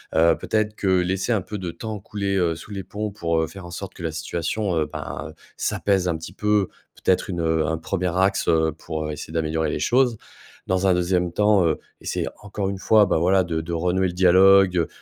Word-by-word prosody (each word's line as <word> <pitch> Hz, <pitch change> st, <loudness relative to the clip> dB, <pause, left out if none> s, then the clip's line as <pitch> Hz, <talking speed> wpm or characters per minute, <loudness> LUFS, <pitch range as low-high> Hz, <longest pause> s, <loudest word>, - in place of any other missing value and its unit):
heu, 85 Hz, 0 st, +4 dB
peut-être 110 Hz, -1 st, -1 dB
que 100 Hz, -, -3 dB
laisser 95 Hz, +3 st, +1 dB
un 105 Hz, -, +1 dB
peu 105 Hz, +3 st, -6 dB
de 90 Hz, -3 st, -4 dB
temps 110 Hz, +4 st, -6 dB
couler, 100 Hz, 0 st, -3 dB
heu, 85 Hz, -3 st, +1 dB
sous 85 Hz, -, -11 dB
les 100 Hz, -1 st, -5 dB
ponts 105 Hz, +3 st, -4 dB
pour, 85 Hz, -5 st, 0 dB
heu, 80 Hz, -, -1 dB
faire 95 Hz, 0 st, -10 dB
en 85 Hz, -, -9 dB
sorte 95 Hz, +2 st, -7 dB
que 85 Hz, -, -9 dB
la 80 Hz, -, -1 dB
situation, 85 Hz, +4 st, -2 dB
heu, 80 Hz, -, +2 dB
ben, -, -, -6 dB
heu, -, -, -12 dB, 0.2 s
s'apaise 95 Hz, -3 st, 0 dB
un 85 Hz, -, 0 dB
petit 80 Hz, -, -9 dB
peu. 105 Hz, -2 st, +1 dB, 0.3 s
Peut-être 95 Hz, -, +2 dB
une 85 Hz, -2 st, -2 dB
un 80 Hz, 0 st, +1 dB
1er 90 Hz, +1 st, -2 dB
axe, 95 Hz, +1 st, +2 dB
heu, 80 Hz, -1 st, +3 dB
pour, 80 Hz, -1 st, -4 dB
heu, -, -, -3 dB
essayer 75 Hz, +1 st, -7 dB
d'améliorer 80 Hz, -1 st, 0 dB
les -, -, -2 dB
choses. 125 Hz, -2 st, +2 dB, 0.5 s
Dans 95 Hz, +1 st, +1 dB
un 95 Hz, -, +5 dB
2e 90 Hz, 0 st, 0 dB
temps, 105 Hz, -3 st, +4 dB
heu, 80 Hz, -, +1 dB, 0.2 s
essayer, -, -, -3 dB
encore 100 Hz, -1 st, -3 dB
une 100 Hz, -, -4 dB
fois, 105 Hz, +2 st, +5 dB
ben 90 Hz, -, +1 dB
voilà 95 Hz, +3 st, +3 dB
de 85 Hz, -2 st, -2 dB
de 85 Hz, +2 st, -5 dB
renouer 90 Hz, +3 st, +1 dB
le 90 Hz, -, -5 dB
dialogue, 95 Hz, -1 st, +5 dB
90 Hz, 225 wpm, -23 LUFS, 85-100 Hz, 0.5 s, un